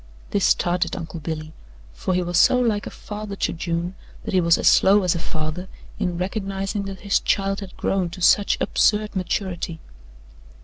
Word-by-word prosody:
This 200 - +2
startled 175 0 +1
Uncle 165 -2 -6
Billy, 155 0 -5 0.4
for 185 - -2
he 180 - +1
was 175 0 +1
so 250 - +5
like 220 -4 0
a - - -4
father 210 -1 -7
to - - -1
June 170 +1 -2 0.3
that - - -5
he 185 - +4
was 170 0 +4
as - - +1
slow 200 +1 +6
as 180 - +2
a 170 - -3
father 160 +2 -4 0.3
in 180 -2 -1
recognizing 195 +1 -3
that 195 -1 -7
his 200 -1 +2
child 195 0 0
has 195 -3 -8
grown 190 -3 -1
to 175 +3 -9
such 200 +3 +4
absurd 210 -1 +2
maturity. 180 -2 -2
185 Hz, 180 wpm, -23 LUFS, 170-200 Hz, 0.4 s, slow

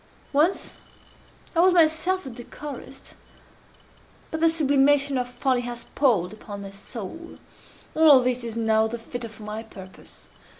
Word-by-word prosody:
Once 315 +7 +1 0.8
I - - +2
was 360 +1 +5
myself 335 +2 +3
a 265 - -6
decorist; 265 +3 -8 1.2
but 320 - -3
that 330 0 +5
sublimation 285 -2 +3
of 250 -1 0
folly 250 0 0
has 240 -1 -6
palled 215 -10 +2
upon 205 -2 -8
my 195 - -8
soul. 230 - -8 0.6
All 305 -4 +7
this 250 0 0
is 230 -1 -5
now 220 -1 +3
the 235 +2 -4
fitter 235 0 -6
for 215 0 -13
my 210 +1 -5
purpose. 190 -4 -12
250 Hz, 140 wpm, -25 LUFS, 225-300 Hz, 1.2 s, All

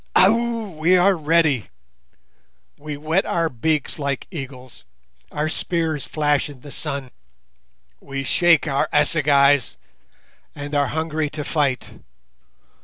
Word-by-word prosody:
Ow! 230 +1 +3
we 175 +4 +4
are 190 +2 +4
ready. 155 - +2 1.1
We 150 0 -7
wet 160 +6 +1
our 165 -1 0
beaks 150 +5 -1
like 140 -2 -2
eagles, 130 - -9 0.5
our 150 +1 -1
spears 160 -2 -2
flash 150 -2 0
in 135 -4 -12
the 145 - -11
sun; 140 -4 -5 0.9
we 135 0 -5
shake 165 +3 +3
our 140 -1 0
assegais, 145 -3 +3 0.8
and 145 0 -7
are 145 -1 +2
hungry 155 +1 -2
to 150 0 -5
fight. 140 -4 -1
150 Hz, 115 wpm, -21 LUFS, 140-165 Hz, 1.1 s, we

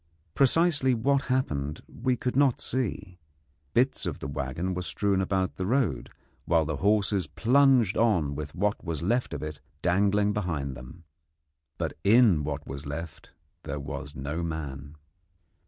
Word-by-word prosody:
Precisely 145 -2 +3
what 135 +4 +1
happened 75 - -1
we 130 +1 -1
could 125 +1 -2
not 135 -3 +3
see. 100 -7 -3 0.6
Bits 130 +3 +2
of - - -3
the - - -6
waggon 70 +6 -3
were 90 - -3
strewn 95 +4 0
about 95 0 -1
the 95 - -2
road, 105 - 0 0.4
while 80 -2 +3
the 80 -2 -2
horses 100 -1 +2
plunged 125 - +4
on 90 -11 +2
with 70 0 -6
what 100 +3 0
was 85 -1 -3
left 120 +7 0
of - - -5
it 75 -1 -6 0.2
dangling 100 +3 +2
behind 80 -10 -2
them. 65 +7 -11 0.7
But - - -2
in 105 -7 +5
what 70 -1 -4
was 70 +1 -7
left 80 +2 -7 0.3
there 70 +1 -5
was 70 0 -6
no 75 +5 -3
man. 75 -3 -5
90 Hz, 150 wpm, -27 LUFS, 75-115 Hz, 0.7 s, in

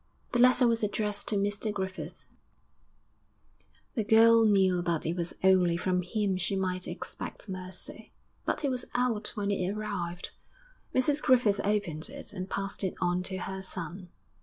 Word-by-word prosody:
The 245 - +1
letter 250 +1 +6
was 230 -1 +2
addressed 210 0 -1
to 215 - +1
Mr 205 +2 0
Griffith; 190 -2 -5 1.7
the 225 - 0
girl 225 +1 +6
knew 190 -3 +4
that 170 -2 -1
it 165 +2 0
was 175 -1 -3
only 180 -3 +5
from 180 +1 +1
him 195 +1 -1
she 185 +2 -1
might 185 -1 -2
expect - - -7
mercy; 185 -1 -5 0.3
but - - -1
he 290 - +1
was 255 -2 -1
out 245 -4 +1
when 205 -1 -1
it 185 -2 0
arrived. 200 -5 -4 0.6
Mrs 285 +3 +3
Griffith 240 -6 +4
opened 200 -4 -1
it, 280 -4 -8
and 185 -1 -5
passed 195 +1 -3
it 190 - -1
on 180 0 +1
to 185 +1 -3
her 190 +1 -5
son. 180 -1 -6
195 Hz, 160 wpm, -29 LUFS, 180-215 Hz, 1.7 s, letter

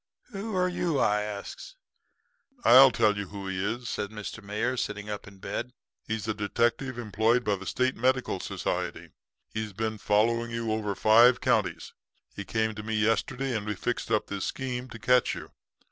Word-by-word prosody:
"'Who 205 0 -4
are 180 0 +2
you?' 175 -4 -1
I 105 -3 +2
asks. 105 - -7 0.9
"'I'll 130 +2 +9
tell 110 -4 +2
you 100 -1 -4
who 100 0 -7
he 95 0 -2
is,' 120 +4 -3
says 100 - -2
Mr. 105 +1 -8
Mayor, 105 +5 -1
sitting 105 -3 -3
up 105 - -6
in 100 -1 -13
bed. 125 +5 -5 0.3
'He's 110 -1 -3
a 110 - +1
detective 120 +4 0
employed 115 +2 +1
by 105 -2 +1
the 95 0 -9
State 130 0 0
Medical 130 -5 +1
Society. - - -3 0.4
He's 110 -2 -3
been 110 +1 -3
following 115 +3 +2
you 115 -1 -2
over 105 -2 -1
five 120 +5 +6
counties. - - 0 0.4
He 100 - -5
came 110 +2 0
to 105 - -7
me 110 +1 -3
yesterday 115 +4 0
and 105 - -1
we 105 0 -3
fixed 120 +5 -3
up 110 -2 +2
this 100 -1 -4
scheme 125 -1 -4
to 115 - -8
catch 125 +2 +3
you. - - -9
110 Hz, 180 wpm, -28 LUFS, 105-125 Hz, 0.9 s, I'll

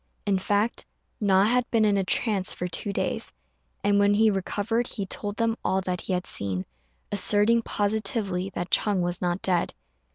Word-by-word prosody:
In 195 -2 +2
fact, 205 +4 0 0.3
Na 195 -2 +4
had 245 +3 +2
been 225 -2 +3
in 205 -1 +3
a 195 - +1
trance 195 0 +1
for 180 - -3
two 190 +3 -3
days, - - -2 0.5
and 205 0 +3
when 205 0 +4
he 220 +1 +4
recovered 210 +4 -1
he 200 -4 -4
told 205 +2 -3
them 230 -1 +1
all 190 - +1
that 180 -1 -3
he - - -3
had 180 0 -1
seen, 95 -2 -2 0.5
asserting 210 +3 +3
positively 205 -3 -1
that 175 +1 -4
Ch'êng 205 -4 +2
was 175 0 -2
not 175 +1 -1
dead. 180 -2 0
200 Hz, 175 wpm, -26 LUFS, 185-215 Hz, 0.5 s, Na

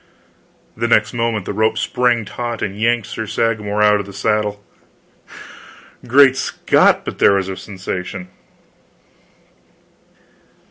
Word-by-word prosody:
The 115 - -1
next 110 -1 +2
moment 115 -4 -1
the - - -4
rope 110 +2 +1
sprang 120 -3 0
taut 120 +1 -5
and 100 -1 -3
yanked 115 +1 0
Sir 110 - -6
Sagramor 105 -1 -1
out 105 0 +4
of 100 - -6
the 100 - -10
saddle! 105 0 -1 1.4
Great 135 +1 +6
Scott, 135 - +2
but - - -6
there - - +5
was 95 -1 0
a 95 - -4
sensation! 95 -2 -6
105 Hz, 125 wpm, -18 LUFS, 100-115 Hz, 1.4 s, Great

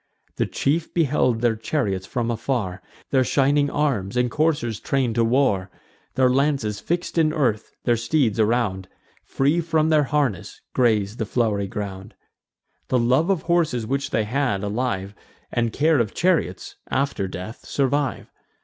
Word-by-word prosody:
The - - +1
chief 155 +4 -1
beheld 135 -7 +2
their 120 -2 +2
chariots 105 -6 -2
from 120 -1 -1
afar, 110 -6 -2 0.3
Their 130 -2 +4
shining 145 +2 +2
arms, 125 -8 -1
and 125 -1 +1
coursers 145 -8 0
train'd 135 -5 0
to 115 0 +2
war: 115 -6 +2 0.5
Their 130 -1 +4
lances 130 -5 +1
fix'd 175 0 -2
in 155 -1 +3
earth, 125 -9 0
their 120 - +3
steeds 115 -1 +1
around, 105 -4 +1 0.4
Free 145 +6 +1
from 160 -1 +1
their 155 -2 +4
harness, 135 - -1
graze 110 -3 +2
the 110 - -2
flow'ry 105 -4 0
ground. 100 0 -6 0.7
The 130 - +2
love 130 +8 +2
of 190 -5 +1
horses 165 -9 +1
which 140 +4 -2
they 110 - +1
had, 120 -3 -1
alive, 100 -2 -2 0.4
And 115 -1 0
care 155 +4 +2
of 115 -4 -1
chariots, 165 - 0
after 135 -7 -1
death 95 +5 -8
survive. 140 0 -1
125 Hz, 150 wpm, -23 LUFS, 110-145 Hz, 0.7 s, Their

